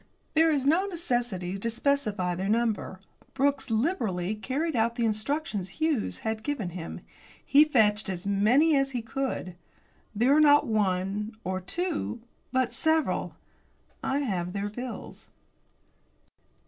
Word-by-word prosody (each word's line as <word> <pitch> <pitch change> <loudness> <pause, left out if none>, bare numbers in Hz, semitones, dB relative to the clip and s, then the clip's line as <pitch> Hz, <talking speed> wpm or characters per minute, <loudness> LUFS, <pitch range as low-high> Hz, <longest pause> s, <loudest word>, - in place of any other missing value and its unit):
There 325 +1 +5
is 285 -4 +1
no 340 +7 +3
necessity 240 - -2
to 230 - -2
specify 225 -7 0
their 190 +3 -2
number. 220 -4 0 0.4
Brooks 280 0 +1
liberally 220 - 0
carried 275 +8 -2
out 235 +1 +1
the 235 -2 0
instructions 215 - -2
Hughes 315 -8 0
had 220 0 -1
given 235 -8 -2
him. 175 -1 -7 0.4
He 290 +2 +6
fetched 215 -8 +2
as 185 0 -4
many 235 +11 +4
as 275 -1 +1
he 240 -2 -2
could. 240 -6 -3 0.6
There 245 +6 +4
were 305 - +5
not 290 -1 +6
one 205 -1 0
or 185 +1 -2
two, 325 - -3 0.3
but 260 -2 +1
several. 315 -1 +1 0.7
I 275 +2 0
have 180 -9 -2
their 200 0 -2
bills. 245 +1 -8
235 Hz, 135 wpm, -28 LUFS, 200-285 Hz, 0.7 s, He